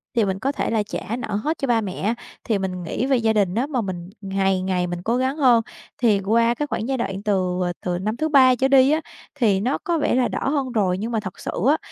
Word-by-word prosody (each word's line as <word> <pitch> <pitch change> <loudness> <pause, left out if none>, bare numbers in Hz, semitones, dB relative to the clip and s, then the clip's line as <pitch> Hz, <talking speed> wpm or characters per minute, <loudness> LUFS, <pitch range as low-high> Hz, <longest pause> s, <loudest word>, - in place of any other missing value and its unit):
thì 230 -3 +3
mình 190 -1 -2
có 270 - 0
thể - - -2
là 220 -2 +1
trả 205 +1 -5
nợ 245 - -4
hết 305 +10 -1
cho 275 - -2
ba 235 -2 +2
mẹ 195 -4 -4
á, 220 +4 0 0.3
thì 215 -4 0
mình 185 -2 -3
nghĩ 175 +8 -2
về 270 -1 +3
gia 225 -2 +2
đình 200 -4 +1
á 245 +5 0
mà 265 -5 -1
mình 180 -4 -5
ngày 195 -1 0
ngày 180 -1 0
mình 175 0 -4
cố 230 +4 +1
gắng 260 +3 0
hơn. 245 -5 +5 0.4
Thì 220 -5 +3
qua 230 +4 +2
cái 295 +5 -3
khoảng 230 -4 -3
giai 265 -1 -1
đoạn 195 -4 -3
từ, 185 -3 0
à, 175 - -2
từ 180 -1 -2
năm 215 +4 -2
thứ 315 +4 -1
3 260 -4 +6
trở 265 +2 +2
đi 270 0 +5
á 310 +1 +2 0.3
thì 215 -8 +2
nó 250 +7 0
có 340 -1 -1
vẻ 295 - +1
là 255 -1 +3
đỡ - - -2
hơn 275 -3 -1
rồi, 190 -6 +1
nhưng 225 +4 -4
mà 225 - 0
thật 185 -3 -8
sự - - -4 0.2
á 305 - +4
225 Hz, 275 wpm, -22 LUFS, 190-260 Hz, 0.4 s, 3